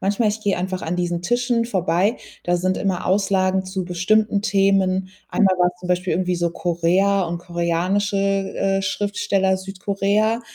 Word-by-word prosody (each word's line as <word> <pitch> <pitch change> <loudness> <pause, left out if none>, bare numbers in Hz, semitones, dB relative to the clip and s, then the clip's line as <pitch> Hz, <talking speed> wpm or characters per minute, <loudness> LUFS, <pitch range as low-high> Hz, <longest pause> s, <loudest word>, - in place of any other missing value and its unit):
manchmal 205 +3 +1
ich 215 +1 -2
gehe 205 -2 0
einfach 185 +1 -3
an 165 +2 -2
diesen 175 -1 -1
Tischen 240 +2 +1
vorbei, 190 0 +1 0.3
da 175 0 +2
sind 185 +1 0
immer 190 -2 -2
Auslagen 190 -1 +1
zu 185 -1 -4
bestimmten 200 +4 +1
Themen. 195 -2 +2 0.2
Einmal 190 -2 +2
war's 180 0 +3
zum 180 - -7
Beispiel 180 0 0
irgendwie 180 +1 0
so 170 -1 0
Korea 180 +4 +1
und 170 0 -3
koreanische, 175 +4 -1
äh, 195 0 0
Schriftsteller, 195 -1 0
Südkorea. 200 +4 -1
190 Hz, 155 wpm, -21 LUFS, 180-200 Hz, 0.3 s, war's